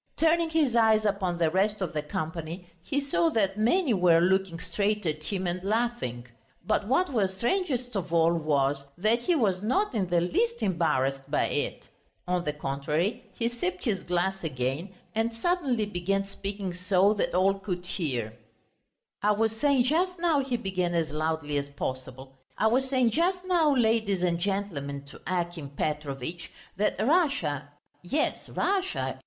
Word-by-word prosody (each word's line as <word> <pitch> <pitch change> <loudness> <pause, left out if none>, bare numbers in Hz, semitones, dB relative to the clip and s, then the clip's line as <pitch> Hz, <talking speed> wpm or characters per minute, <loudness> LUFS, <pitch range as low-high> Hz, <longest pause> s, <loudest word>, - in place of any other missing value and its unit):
Turning 330 +1 +3
his 305 -7 +2
eyes 220 -2 +4
upon 195 -4 0
the 165 -2 +2
rest 205 +4 +1
of 185 -4 -3
the 150 - -1
company, 160 +3 -5 0.2
he 280 +8 -1
saw 330 +4 +3
that 200 -8 +1
many 245 - +2
were 175 -4 +5
looking 185 -1 +1
straight 210 +2 -1
at 155 -1 -1
him 190 +3 -3
and 180 +1 -2
laughing. 215 - -1 0.4
But 200 - +1
what 280 +5 +2
was 190 -5 0
strangest 250 - -1
of 185 -4 -3
all 165 0 +4
was, 145 -4 +1
that 215 +6 +2
he 335 +9 +1
was 195 - +1
not 330 - +1
in 200 -5 0
the 175 -1 +3
least 460 - 0
embarrassed 135 -7 0
by - - +1
it; - - -3 0.4
on 180 -1 0
the 150 - +1
contrary, 150 +6 -2
he 230 - 0
sipped 185 -7 -3
his 200 -6 0
glass 180 +2 -1
again 135 +4 -2 0.2
and 225 +1 0
suddenly 265 -5 0
began 195 0 -1
speaking 195 -1 -5
so 185 +3 +3
that 205 - -1
all 195 +2 +3
could 180 -2 -4
hear: 130 - -3 0.9
"I 210 +1 +3
was 220 +1 +1
saying 275 0 +3
just 355 +7 +1
now," 335 -4 +2
he 265 -3 -1
began 185 -5 -1
as 165 -3 0
loudly 155 -1 -1
as 140 0 -6
possible, 130 -1 -6 0.2
"I - - +1
was 260 +4 +2
saying 255 -3 +3
just 360 - +1
now, 340 -5 +3
ladies 220 -6 +2
and 170 -1 +1
gentlemen, 170 -8 -3
to - - -13
Akim 175 -5 -2
Petrovitch, 150 +2 -3 0.3
that 210 - +2
Russia... 220 - +1 0.3
yes, 280 +13 -1
Russia 385 -1 -1
195 Hz, 165 wpm, -28 LUFS, 165-235 Hz, 0.9 s, were